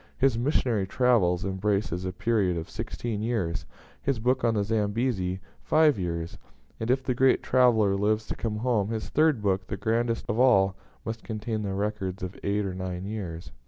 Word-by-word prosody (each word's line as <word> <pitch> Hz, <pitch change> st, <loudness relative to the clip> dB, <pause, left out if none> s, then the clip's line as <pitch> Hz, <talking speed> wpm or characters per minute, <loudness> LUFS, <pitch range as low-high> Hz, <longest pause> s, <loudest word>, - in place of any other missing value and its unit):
His 135 Hz, -3 st, +3 dB
'Missionary 120 Hz, -5 st, +1 dB
Travels' 100 Hz, -7 st, +2 dB
embraces 95 Hz, -1 st, -1 dB
a 95 Hz, -, -2 dB
period 100 Hz, -2 st, +1 dB
of 80 Hz, -, -6 dB
sixteen 110 Hz, 0 st, -4 dB
years; 110 Hz, -8 st, -2 dB, 0.3 s
his 140 Hz, -3 st, 0 dB
book 125 Hz, +4 st, +1 dB
on 115 Hz, -1 st, +2 dB
the 105 Hz, -, +1 dB
Zambezi, 105 Hz, -3 st, 0 dB, 0.2 s
five 155 Hz, -7 st, +3 dB
years; 85 Hz, -2 st, -3 dB, 0.4 s
and 110 Hz, -, -3 dB
if 130 Hz, +1 st, +2 dB
the 130 Hz, -, 0 dB
great 130 Hz, +2 st, +3 dB
traveller 115 Hz, -6 st, +4 dB
lives 105 Hz, +2 st, +1 dB
to -, -, -2 dB
come 110 Hz, -2 st, -3 dB
home, 110 Hz, -3 st, 0 dB
his 110 Hz, -1 st, -3 dB
third 150 Hz, -7 st, +2 dB
book, 95 Hz, -1 st, 0 dB
the -, -, -4 dB
grandest 115 Hz, +1 st, 0 dB
of 110 Hz, -, -1 dB
all, 100 Hz, -7 st, +5 dB, 0.3 s
must 115 Hz, 0 st, -5 dB
contain 110 Hz, 0 st, -3 dB
the 100 Hz, -2 st, -3 dB
records 100 Hz, -2 st, -3 dB
of 95 Hz, +1 st, -5 dB
eight 100 Hz, +1 st, 0 dB
or 95 Hz, -, -3 dB
nine 90 Hz, 0 st, -4 dB
years. 95 Hz, -6 st, -6 dB
105 Hz, 180 wpm, -27 LUFS, 95-120 Hz, 0.4 s, all